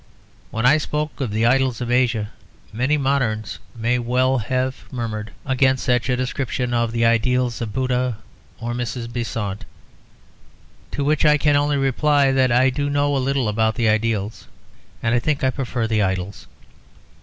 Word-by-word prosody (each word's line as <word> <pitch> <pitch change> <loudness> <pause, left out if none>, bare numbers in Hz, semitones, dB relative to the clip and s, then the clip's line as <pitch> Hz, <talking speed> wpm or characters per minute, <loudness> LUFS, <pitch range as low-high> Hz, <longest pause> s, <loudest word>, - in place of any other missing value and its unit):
When 115 +2 -2
I 150 +5 +6
spoke 150 0 -3
of 130 - -1
the 110 +2 0
idols 130 -1 +2
of 120 -1 -3
Asia, 120 -4 +1 0.4
many 130 +7 +1
moderns 130 -7 -1 0.2
may 120 +2 0
well 125 +2 +1
have 130 +3 -3
murmured 110 -4 -4 0.2
against 130 -1 +2
such 125 0 +1
a 125 - +1
description 125 -1 -2
of 115 -1 +1
the 115 0 +1
ideals 120 +1 +1
of 115 -2 -3
Buddha 125 -1 -1 0.4
or 120 +1 -3
Mrs. 120 -1 -4
Besant. 115 -4 -3 1.3
To 140 - -1
which 150 +1 +1
I 150 -1 +5
can 145 0 +2
only 145 0 +2
reply 140 +1 +2
that 130 -2 +2
I 130 +2 +4
do 145 +2 -2
know 145 0 +1
a - - +1
little 135 -2 0
about 110 +1 +1
the 115 -3 +2
ideals, 110 -1 -1 0.6
and 115 - +1
I 120 - +3
think 145 +3 -1
I 130 - +3
prefer 125 -3 -2
the 110 -1 +1
idols. 95 0 -3
125 Hz, 165 wpm, -21 LUFS, 115-135 Hz, 1.3 s, I